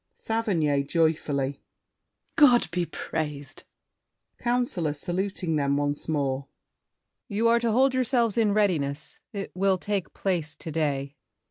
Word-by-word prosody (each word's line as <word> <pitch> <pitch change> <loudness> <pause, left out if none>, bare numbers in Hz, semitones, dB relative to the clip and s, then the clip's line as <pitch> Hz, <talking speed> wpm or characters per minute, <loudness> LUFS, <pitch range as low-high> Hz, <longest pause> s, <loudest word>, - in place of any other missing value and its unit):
SAVERNY 175 -11 0
(joyfully). 145 -4 0 0.7
God 245 - +5
be 175 0 -1
praised! 145 -3 -5 0.7
COUNCILOR 240 -11 0
(saluting 180 0 -2
them 140 -1 +1
once 145 +1 -2
more). 140 -3 -1 0.8
You 225 0 +1
are 235 0 +5
to 235 0 0
hold 260 +4 +4
yourselves 240 -4 +2
in 220 -3 +3
readiness; 155 -9 0
It 200 -2 -5
will 190 +1 +2
take 200 0 -2
place 170 -6 -1
to 160 - -7
day. 145 -3 -1
170 Hz, 120 wpm, -26 LUFS, 145-215 Hz, 0.8 s, God